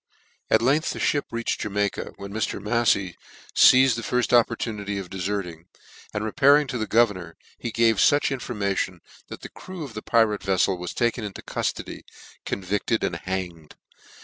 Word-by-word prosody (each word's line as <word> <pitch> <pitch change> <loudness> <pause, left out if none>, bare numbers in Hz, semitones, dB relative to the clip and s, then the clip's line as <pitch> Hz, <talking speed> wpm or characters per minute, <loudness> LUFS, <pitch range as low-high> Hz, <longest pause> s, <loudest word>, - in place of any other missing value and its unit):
At 110 +1 +3
length 145 +6 +2
the - - -7
fnip 145 - +1
reached 115 0 -2
Jamaica, 105 -1 -2
when 100 0 -9
Mr. 110 -2 -2
Mafley 105 -4 +1 0.4
feized 130 -2 +7
the 115 - -4
firft 125 +1 -1
opportunity 110 -4 +1
of 95 -2 -7
deferting; 90 -3 -4 0.4
and 105 - -3
repairing 140 +6 +4
to 125 - -3
the 110 - -2
governor, 100 -7 +1 0.2
he 120 - -4
gavefuch 115 +6 +3
infor 125 -1 -6
^mation, 95 -3 -1 0.3
that - - -9
the - - -8
crew 185 -3 -9
of 135 -6 -8
the 105 - -6
pirate 110 -3 +2
veflel 95 -1 +1
was 90 0 -6
taken 120 -1 0
into 105 -2 -7
cuftody, - - -4 0.5
convicted 100 +4 -1
and 85 - -1
hanged. 90 -4 -5
105 Hz, 160 wpm, -24 LUFS, 95-120 Hz, 0.5 s, feized